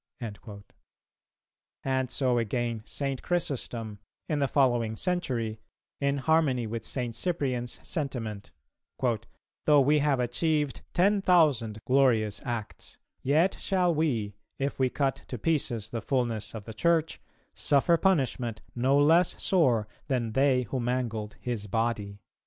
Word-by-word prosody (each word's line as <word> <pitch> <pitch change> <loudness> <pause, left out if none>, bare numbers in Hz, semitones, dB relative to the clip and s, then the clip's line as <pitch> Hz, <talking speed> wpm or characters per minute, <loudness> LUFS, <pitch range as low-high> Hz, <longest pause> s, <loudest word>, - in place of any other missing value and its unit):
"[269:1] 105 -3 -8 1.2
And 130 -1 0
so 125 -2 +1
again 115 0 -1
St. 135 -2 -3
Chrysostom, 120 - -3 0.3
in 150 - 0
the 140 - +2
following 120 -5 +2
century, 120 - -1 0.4
in 140 0 +1
harmony 135 -4 +2
with 115 +1 -4
St. 120 -3 -3
Cyprian's 130 -9 -2
sentiment: 115 - -4 1.2
"Though 150 -1 +6
we 150 +3 +4
have 145 -2 +2
achieved 145 +4 0
ten 200 +3 +3
thousand 145 - +3
glorious 120 -6 +2
acts, 115 -4 -6 0.2
yet 160 +8 +2
shall 180 -3 +1
we, 125 -10 0 0.2
if 140 0 -2
we 130 -1 +3
cut 135 0 -1
to 125 - -5
pieces 120 -6 -1
the 115 - -3
fulness 120 -4 -1
of 110 - -6
the 110 - -7
Church, 165 +5 +1 0.3
suffer 145 +4 +3
punishment 130 - 0
no 130 +3 +2
less 165 +5 +4
sore 125 - +2 0.2
than 125 -5 -1
they 130 +1 +3
who 125 +3 -3
mangled 115 -4 -2
His 115 -4 -3
body." 105 -2 -1
130 Hz, 130 wpm, -28 LUFS, 115-145 Hz, 1.2 s, Though